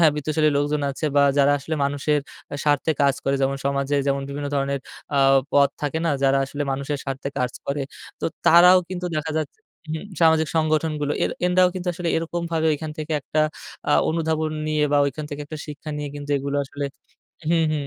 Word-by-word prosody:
হ্যাঁ 160 -3 +6
বিত্তশালী 155 +1 +1
লোকজন 145 0 0
আছে, 140 - -6
বা 145 - +6 0.2
যারা 140 +1 +5
আসলে 160 +3 -4
মানুষের 145 +1 +1 0.4
স্বার্থে 145 +2 +2
কাজ 140 -1 +4
করে। 135 - +2
যেমন 135 +1 +1
সমাজে 140 +1 0
যেমন 140 0 +1
বিভিন্ন 145 +1 -4
ধরনের 140 -1 0 0.4
আ - - +4 0.3
পথ 140 -1 +5
থাকে 150 +2 -1
না? - - +2
যারা 135 0 +4
আসলে 145 +2 -4
মানুষের 140 +1 -3
স্বার্থে 135 0 -4
কাজ 125 -1 0
করে 140 0 -1 0.4
তো - - -4 0.2
তারাও 180 +2 +8
কিন্তু 180 -1 -4
দেখা 155 +1 -2
যাচ্ছে 155 - -5 0.3
হুম 160 +3 -4 0.2
সামাজিক 160 -1 +4
সংগঠনগুলো 155 -2 +1
এর - - 0 0.2
এনদাও 180 0 +4
কিন্তু 180 -1 -3
আসলে 170 0 -3
এরকমভাবে 165 -1 -1
ওইখান 155 +1 -3
থেকে 155 +1 -4
একটা 155 +3 -1 0.5
আ - - +5 0.2
অনুধাবন 160 -1 0 0.2
নিয়ে 155 -1 +1
বা 145 - +5
ওইখান 145 +2 -4
থেকে 145 - -5
একটা 155 +1 -7
শিক্ষা 150 +1 -7
নিয়ে 150 -1 -4
কিন্তু 145 0 -7
এগুলো 140 +1 -3
আসলে 145 +1 -4 0.6
হুম, 165 -1 +3
হুম, 145 -2 -2
150 Hz, 190 wpm, -23 LUFS, 140-160 Hz, 0.6 s, তারাও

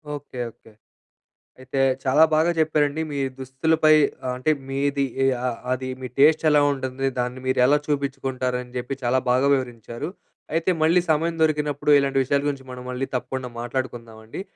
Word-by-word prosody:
Okay. 145 -3 -9
Okay. 110 - -21 0.9
అయితే, 130 +1 -4 0.2
చాలా 140 +4 +5
బాగా 160 +2 +3
చెప్పారండి. 150 -1 +1
మీ 145 - -4 0.2
దుస్తులపై 155 +4 +2 0.3
ఆహ్, 125 - 0
అంటే 130 +5 +1 0.2
మీది 140 0 0 0.2
ఎ - - +4 0.2
ఆహ్, 120 - -3
అది 130 0 -2
మీ 130 - -4
టేస్ట్ 155 +3 +5
ఎలా 150 -1 +5
ఉంటుంది, 135 0 -3
దాన్ని 125 +1 -2
మీరు 130 - +1
ఎలా 145 +3 +5
చూపించుకుంటారు 135 -3 -2
అని 125 0 -13
జెప్పి 125 +2 -4
చాలా 125 +2 +2
బాగా 130 +3 +3
వివరించారు. 120 +2 -5 0.4
అయితే, 165 +3 +1
మళ్ళీ 170 +3 +4
సమయం 165 +2 +1
దొరికినప్పుడు 150 -2 +1
ఇలాంటి 135 -1 +1
విషయాల 140 +2 +1
గురించి 135 -2 -4
మనం 125 0 -8
మళ్ళీ 130 +1 -3
తప్పకుండా 130 0 -3
మాట్లాడుకుందామండి. 120 -1 -5
135 Hz, 155 wpm, -23 LUFS, 125-150 Hz, 0.9 s, చాలా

